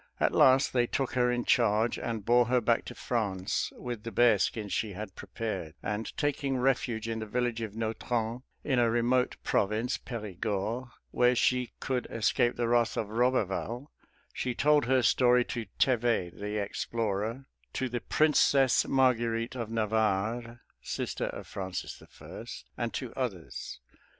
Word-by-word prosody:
At -, -, +2 dB
last 130 Hz, +1 st, +5 dB
they 120 Hz, -1 st, +2 dB
took 135 Hz, +1 st, -1 dB
her 125 Hz, -1 st, +2 dB
in 120 Hz, 0 st, -1 dB
charge, 115 Hz, -2 st, +2 dB
and 110 Hz, -4 st, -4 dB
bore 120 Hz, +1 st, +5 dB
her 125 Hz, 0 st, +3 dB
back 115 Hz, 0 st, +1 dB
to -, -, -8 dB
France 100 Hz, -4 st, -1 dB
with 120 Hz, -3 st, -5 dB
the 115 Hz, -, -6 dB
bearskins 110 Hz, -3 st, +2 dB
she 105 Hz, -3 st, -1 dB
had 95 Hz, 0 st, -7 dB
prepared; 95 Hz, -5 st, -5 dB
and 105 Hz, +2 st, -3 dB
taking 140 Hz, -2 st, 0 dB
refuge 125 Hz, -3 st, 0 dB
in 115 Hz, -1 st, -2 dB
the 110 Hz, -, -5 dB
village 120 Hz, 0 st, -1 dB
of 110 Hz, -2 st, -5 dB
Nautron, 115 Hz, +1 st, -2 dB, 0.2 s
in 130 Hz, -4 st, +1 dB
a 120 Hz, -1 st, +4 dB
remote 120 Hz, +2 st, +2 dB
province 110 Hz, +5 st, 0 dB
(Perigord), 110 Hz, +1 st, -3 dB, 0.2 s
where 125 Hz, 0 st, +3 dB
she 125 Hz, 0 st, +1 dB
could 130 Hz, -2 st, -2 dB
escape 115 Hz, +2 st, +1 dB
the 120 Hz, -1 st, 0 dB
wrath 120 Hz, -1 st, +2 dB
of 105 Hz, -, -2 dB
Roberval, 120 Hz, +2 st, 0 dB, 0.4 s
she 125 Hz, -1 st, -2 dB
told 150 Hz, 0 st, +4 dB
her 130 Hz, 0 st, +3 dB
story 125 Hz, +1 st, +4 dB
to 115 Hz, -3 st, -4 dB
Thevet, 120 Hz, -8 st, +1 dB
the 105 Hz, +1 st, -3 dB
explorer, 110 Hz, +3 st, -2 dB, 0.3 s
to 130 Hz, -, -1 dB
the 120 Hz, -1 st, -3 dB
Princess 140 Hz, -4 st, +3 dB
Marguerite 120 Hz, -3 st, +2 dB
of 115 Hz, -3 st, -4 dB
Navarre 110 Hz, +1 st, 0 dB, 0.2 s
(sister -, -, -3 dB
of -, -, -6 dB
Francis 95 Hz, -2 st, -5 dB, 0.2 s
I.), -, -, -9 dB, 0.3 s
and -, -, -2 dB
to -, -, -4 dB
others. -, -, -5 dB
115 Hz, 150 wpm, -29 LUFS, 110-125 Hz, 0.4 s, last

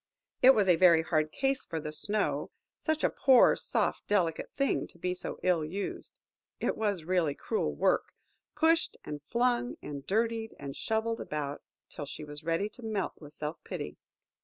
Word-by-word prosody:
It 260 Hz, +1 st, +8 dB
was 205 Hz, -3 st, +3 dB
a 180 Hz, -2 st, +5 dB
very 170 Hz, -3 st, +6 dB
hard 155 Hz, -2 st, +1 dB
case 270 Hz, -, 0 dB
for 165 Hz, -, -4 dB
the 150 Hz, 0 st, -5 dB
snow! 205 Hz, +7 st, -1 dB, 0.3 s
Such 315 Hz, -1 st, -1 dB
a -, -, +4 dB
poor, 260 Hz, -3 st, +6 dB
soft, -, -, -1 dB
delicate 180 Hz, -6 st, +1 dB
thing 275 Hz, -1 st, +1 dB
to -, -, -21 dB
be 180 Hz, +1 st, -1 dB
so 180 Hz, -, -6 dB
ill 175 Hz, -3 st, +3 dB
used,–it 190 Hz, +6 st, -5 dB
was 205 Hz, -6 st, -1 dB
really 165 Hz, -4 st, +1 dB
cruel 445 Hz, -, -1 dB
work! -, -, +2 dB, 0.5 s
Pushed, 330 Hz, 0 st, +3 dB
and 150 Hz, -1 st, -5 dB
flung, 240 Hz, -, +1 dB
and 140 Hz, -2 st, -7 dB
dirtied, 225 Hz, +2 st, 0 dB
and 140 Hz, -1 st, -7 dB
shovelled 225 Hz, +1 st, -1 dB
about 145 Hz, -1 st, -4 dB, 0.3 s
till 145 Hz, -, -7 dB
she 155 Hz, -, -7 dB
was 150 Hz, 0 st, -8 dB
ready 165 Hz, +5 st, 0 dB
to 245 Hz, -, -15 dB
melt 215 Hz, -4 st, -2 dB
with 150 Hz, -2 st, -12 dB
self 150 Hz, +2 st, -5 dB
pity. -, -, -6 dB
185 Hz, 170 wpm, -30 LUFS, 155-230 Hz, 0.5 s, It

